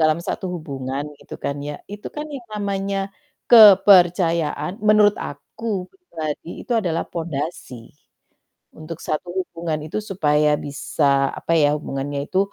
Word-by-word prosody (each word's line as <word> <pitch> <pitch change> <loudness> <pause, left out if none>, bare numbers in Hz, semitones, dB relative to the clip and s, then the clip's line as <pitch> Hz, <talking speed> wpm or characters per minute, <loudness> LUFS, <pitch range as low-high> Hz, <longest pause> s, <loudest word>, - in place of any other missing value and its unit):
dalam 155 0 +3
satu - - -4
hubungan 140 -3 -5 0.2
gitu - - -10
kan 140 - -1
ya, 145 +1 -5 0.2
itu 210 - -7
kan 300 - -3
yang 255 -4 -8
namanya, 200 -1 -2 0.5
kepercayaan, 180 -7 +6 0.2
menurut 210 -1 +5
aku 215 -5 -5
pribadi, 165 - -6 0.2
itu - - -3
adalah 170 -5 -1
pondasi, 150 -7 -5 0.9
untuk 160 +1 -8
satu 155 +3 -2
hubungan 165 -3 -4
itu 160 - -4
supaya 150 -5 +2 0.2
bisa, 145 +1 -3 0.3
apa - - -3
ya, 145 - +5
hubungannya 140 -1 -4
itu 185 - +1
165 Hz, 130 wpm, -21 LUFS, 150-195 Hz, 0.9 s, kepercayaan